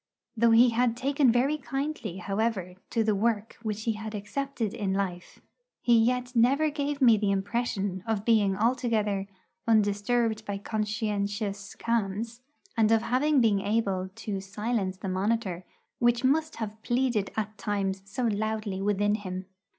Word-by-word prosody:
Though 235 Hz, +1 st, +4 dB
he 235 Hz, +2 st, +6 dB
had 235 Hz, 0 st, +1 dB
taken 275 Hz, 0 st, +3 dB
very 270 Hz, +6 st, +2 dB
kindly, 275 Hz, -, -4 dB
however, 195 Hz, -1 st, -1 dB, 0.2 s
to 225 Hz, -, +1 dB
the 215 Hz, -1 st, +2 dB
work 215 Hz, +1 st, 0 dB
which 215 Hz, -1 st, -3 dB
he 225 Hz, -, +1 dB
had 215 Hz, 0 st, -6 dB
accepted 225 Hz, +2 st, -3 dB
in 195 Hz, -2 st, -1 dB
life, 180 Hz, -3 st, -4 dB, 0.4 s
he 240 Hz, -, +4 dB
yet 250 Hz, +2 st, +2 dB
never 275 Hz, +7 st, +4 dB
gave 285 Hz, -1 st, -2 dB
me 230 Hz, -3 st, +7 dB
the 205 Hz, -1 st, 0 dB
impression 200 Hz, -1 st, -1 dB
of 215 Hz, -2 st, -1 dB
being 205 Hz, -4 st, +3 dB
altogether 220 Hz, -4 st, +1 dB, 0.4 s
'undisturbed 220 Hz, +1 st, +2 dB
by 200 Hz, -2 st, -3 dB
conscientious 205 Hz, -1 st, -2 dB
qualms,' 230 Hz, +1 st, -2 dB, 0.3 s
and 225 Hz, -1 st, +3 dB
of 225 Hz, 0 st, +4 dB
having 260 Hz, +4 st, +2 dB
been 215 Hz, -4 st, +3 dB
able 195 Hz, -3 st, 0 dB
to 195 Hz, -3 st, -4 dB
silence 200 Hz, -1 st, -2 dB
the 190 Hz, -, -6 dB
monitor 190 Hz, -1 st, -1 dB, 0.3 s
which 240 Hz, 0 st, +3 dB
must 310 Hz, +4 st, +2 dB
have 215 Hz, -1 st, -6 dB
pleaded 240 Hz, -5 st, 0 dB
at 215 Hz, 0 st, -2 dB
times 195 Hz, -2 st, -1 dB
so 245 Hz, +6 st, -4 dB
loudly 215 Hz, -3 st, -1 dB
within 205 Hz, +1 st, +2 dB
him. 185 Hz, -3 st, -4 dB
220 Hz, 150 wpm, -28 LUFS, 200-240 Hz, 0.4 s, me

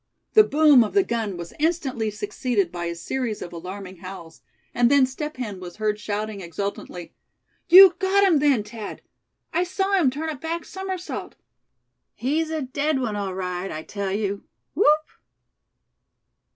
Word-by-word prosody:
The 430 Hz, -, +8 dB
boom 295 Hz, -, +5 dB
of 215 Hz, -, -5 dB
the 395 Hz, -, +5 dB
gun 225 Hz, -, -3 dB
was 170 Hz, -1 st, -8 dB
instantly 290 Hz, -9 st, 0 dB
succeeded 210 Hz, -1 st, -1 dB
by 175 Hz, -1 st, -4 dB
a 170 Hz, 0 st, -3 dB
series 230 Hz, +5 st, -3 dB
of 175 Hz, -, -9 dB
alarming 185 Hz, +2 st, -8 dB
howls; 180 Hz, -2 st, -10 dB, 0.3 s
and 240 Hz, -1 st, +3 dB
then 280 Hz, -1 st, +5 dB
Step 300 Hz, +3 st, -6 dB
Hen 210 Hz, -7 st, -5 dB
was 175 Hz, -1 st, -9 dB
heard 210 Hz, -1 st, -1 dB
shouting 210 Hz, 0 st, -4 dB
exultantly: 180 Hz, 0 st, -6 dB, 0.6 s
"You 370 Hz, +1 st, +10 dB
got 395 Hz, +1 st, +3 dB
him 355 Hz, -7 st, +4 dB
then, 275 Hz, -7 st, +3 dB
Thad! 215 Hz, 0 st, -8 dB, 0.5 s
I 350 Hz, -, +2 dB
saw 385 Hz, +2 st, -2 dB
him 350 Hz, -9 st, +4 dB
turn 305 Hz, +5 st, -4 dB
a 310 Hz, -, -3 dB
back 325 Hz, +4 st, -4 dB
somersault. 380 Hz, -2 st, -6 dB, 0.8 s
He's 310 Hz, +6 st, -1 dB
a 315 Hz, -2 st, -2 dB
dead 285 Hz, +3 st, -1 dB
one, 230 Hz, -5 st, -2 dB
all 195 Hz, -2 st, -3 dB
right, 180 Hz, 0 st, -4 dB
I 155 Hz, 0 st, -5 dB
tell 200 Hz, +1 st, -4 dB
you, 200 Hz, 0 st, -2 dB, 0.3 s
whoop!" 305 Hz, -4 st, +3 dB
235 Hz, 160 wpm, -24 LUFS, 195-310 Hz, 0.8 s, You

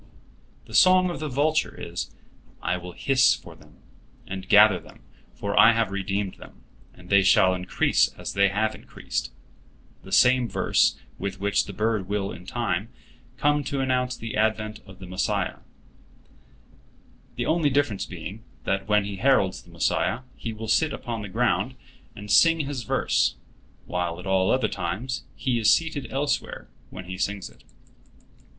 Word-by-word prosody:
The -, -, -14 dB
song 185 Hz, -1 st, +5 dB
of -, -, -6 dB
the 155 Hz, -1 st, -3 dB
vulture 150 Hz, +4 st, +1 dB
is: 85 Hz, +1 st, -5 dB, 0.5 s
"I 90 Hz, -, -1 dB
will 90 Hz, 0 st, -7 dB
hiss 130 Hz, +3 st, +3 dB
for -, -, -12 dB
them, -, -, -21 dB, 0.4 s
and 95 Hz, -1 st, -7 dB
gather 105 Hz, -3 st, +7 dB
them; -, -, -17 dB, 0.3 s
for 100 Hz, 0 st, -3 dB
I 110 Hz, +3 st, +7 dB
have 110 Hz, -3 st, 0 dB
redeemed 100 Hz, 0 st, -2 dB
them, -, -, -15 dB, 0.3 s
and 90 Hz, +1 st, -15 dB
they 100 Hz, 0 st, +6 dB
shall 95 Hz, -1 st, +5 dB
increase 90 Hz, 0 st, +2 dB
as -, -, -5 dB
they 100 Hz, 0 st, +4 dB
have 105 Hz, +3 st, 0 dB
increased"—the 95 Hz, -, -9 dB
same 125 Hz, +3 st, +4 dB
verse -, -, +2 dB, 0.2 s
with 100 Hz, 0 st, -4 dB
which 100 Hz, +1 st, +1 dB
the -, -, -7 dB
bird 105 Hz, -2 st, -1 dB
will 100 Hz, -1 st, -1 dB
in 90 Hz, -, -11 dB
time 110 Hz, -4 st, -2 dB
to 125 Hz, +1 st, -28 dB
come 145 Hz, 0 st, +3 dB, 0.2 s
announce 125 Hz, -1 st, 0 dB
the 115 Hz, -1 st, -6 dB
advent 110 Hz, 0 st, 0 dB
of 95 Hz, -1 st, -13 dB
the 95 Hz, -, -10 dB
Messiah, 90 Hz, +1 st, -2 dB, 1.8 s
the -, -, -2 dB
only 160 Hz, -2 st, +2 dB
difference 140 Hz, -7 st, 0 dB
being, 95 Hz, +5 st, -8 dB, 0.2 s
that 95 Hz, 0 st, -1 dB
when 105 Hz, -1 st, +3 dB
he 100 Hz, -1 st, -5 dB
heralds 115 Hz, -6 st, +2 dB
the -, -, -20 dB
Messiah 125 Hz, -, 0 dB
he 115 Hz, -, -5 dB
will 110 Hz, 0 st, -7 dB
sit 155 Hz, +7 st, +2 dB
upon 115 Hz, -3 st, -5 dB
the 105 Hz, -, -7 dB
ground -, -, 0 dB, 0.4 s
and 105 Hz, 0 st, -7 dB
sing 165 Hz, +7 st, +5 dB
his 140 Hz, -3 st, -4 dB
verse, 110 Hz, -, +1 dB, 0.5 s
while 85 Hz, -1 st, -3 dB
at 90 Hz, -, -10 dB
all 95 Hz, -1 st, +2 dB
other 130 Hz, -4 st, +2 dB
times 100 Hz, +9 st, -4 dB
he 125 Hz, -4 st, -1 dB
is 110 Hz, -, +5 dB
seated 160 Hz, -4 st, 0 dB
elsewhere 140 Hz, +2 st, -2 dB, 0.2 s
when 90 Hz, -, -9 dB
he 95 Hz, 0 st, -7 dB
sings 100 Hz, -1 st, -2 dB
it. -, -, -22 dB
105 Hz, 160 wpm, -25 LUFS, 95-130 Hz, 1.8 s, gather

